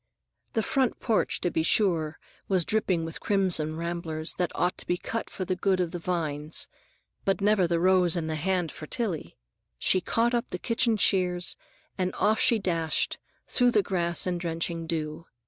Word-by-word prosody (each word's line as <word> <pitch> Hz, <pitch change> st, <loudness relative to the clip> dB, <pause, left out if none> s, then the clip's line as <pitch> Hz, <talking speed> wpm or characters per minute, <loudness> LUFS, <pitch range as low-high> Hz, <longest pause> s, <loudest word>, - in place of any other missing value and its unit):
The 225 Hz, -, +1 dB
front 265 Hz, +1 st, 0 dB
porch, 225 Hz, -4 st, +1 dB
to 175 Hz, -, 0 dB
be 160 Hz, -, +1 dB
sure, 160 Hz, -3 st, +2 dB, 0.3 s
was 185 Hz, -4 st, +2 dB
dripping 185 Hz, -6 st, +1 dB
with 165 Hz, -, -5 dB
crimson 180 Hz, -6 st, +1 dB
ramblers 165 Hz, -1 st, -2 dB
that 180 Hz, -, 0 dB
ought 180 Hz, 0 st, +1 dB
to -, -, -7 dB
be 175 Hz, -, +1 dB
cut 230 Hz, +5 st, -4 dB
for 185 Hz, -, -5 dB
the 185 Hz, -, -1 dB
good 185 Hz, +1 st, +1 dB
of 175 Hz, -2 st, 0 dB
the 175 Hz, -, -5 dB
vines; 155 Hz, -3 st, -2 dB, 0.6 s
but 195 Hz, 0 st, +1 dB
never 200 Hz, -3 st, +3 dB
the 170 Hz, 0 st, +1 dB
rose 180 Hz, -1 st, +4 dB
in 170 Hz, -2 st, -1 dB
the 160 Hz, -, -2 dB
hand 175 Hz, +1 st, -1 dB
for 155 Hz, -, -9 dB
Tillie! 180 Hz, -, -3 dB, 0.4 s
She 185 Hz, -, +3 dB
caught 235 Hz, +6 st, +1 dB
up 240 Hz, -1 st, 0 dB
the -, -, -3 dB
kitchen 230 Hz, +3 st, +1 dB
shears 180 Hz, -3 st, +2 dB, 0.4 s
and 185 Hz, 0 st, -1 dB
off 215 Hz, +1 st, +2 dB
she 235 Hz, -, +5 dB
dashed 165 Hz, -5 st, 0 dB, 0.3 s
through 245 Hz, -2 st, +3 dB
grass 180 Hz, -5 st, +2 dB
and 180 Hz, -1 st, -1 dB
drenching 165 Hz, -1 st, -3 dB
dew. 160 Hz, 0 st, -4 dB
180 Hz, 180 wpm, -27 LUFS, 165-195 Hz, 0.6 s, she